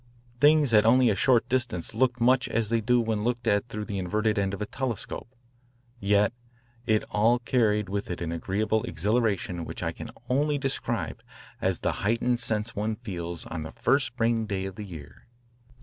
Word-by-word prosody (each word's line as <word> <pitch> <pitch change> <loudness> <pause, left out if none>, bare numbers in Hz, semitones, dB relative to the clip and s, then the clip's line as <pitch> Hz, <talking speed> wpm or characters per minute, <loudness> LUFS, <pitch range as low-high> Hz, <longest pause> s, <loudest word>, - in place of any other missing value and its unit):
Things 145 -2 +5
at 105 -1 +7
only 125 +1 +5
a - - 0
short 120 +3 +3
distance 125 -9 -2
looked 125 -2 +1
much 125 +2 +3
as 110 -2 0
they 115 0 +1
do 125 +3 +3
when 110 -2 -1
looked 120 0 -1
at 100 +3 +2
through 105 0 -5
the 100 -3 -4
inverted 105 +3 0
end 100 -1 0
of - - -11
a 105 - -2
telescope. 120 -1 -4 0.7
Yet 105 +1 +2 0.5
it 110 -2 +3
all 115 +4 +3
carried 110 -4 +1
with 100 +1 -3
it 90 - -4
an 85 -1 -3
agreeable 105 +6 -1
exhilaration 95 -1 0
which - - -6
I - - -1
can - - -8 0.2
only 145 +3 +1
describe 135 -1 -3 0.4
as - - +1
the - - +1
heightened 120 +3 +1
sense 110 -1 +1
one 110 +2 -1
feels 85 -8 -6
on 80 - -5
the 80 - -7
first 140 0 +2
spring 115 -2 0
day 95 -2 -2
of 95 - -5
the 105 +2 -7
year. 75 -7 -11
110 Hz, 185 wpm, -27 LUFS, 100-120 Hz, 0.7 s, at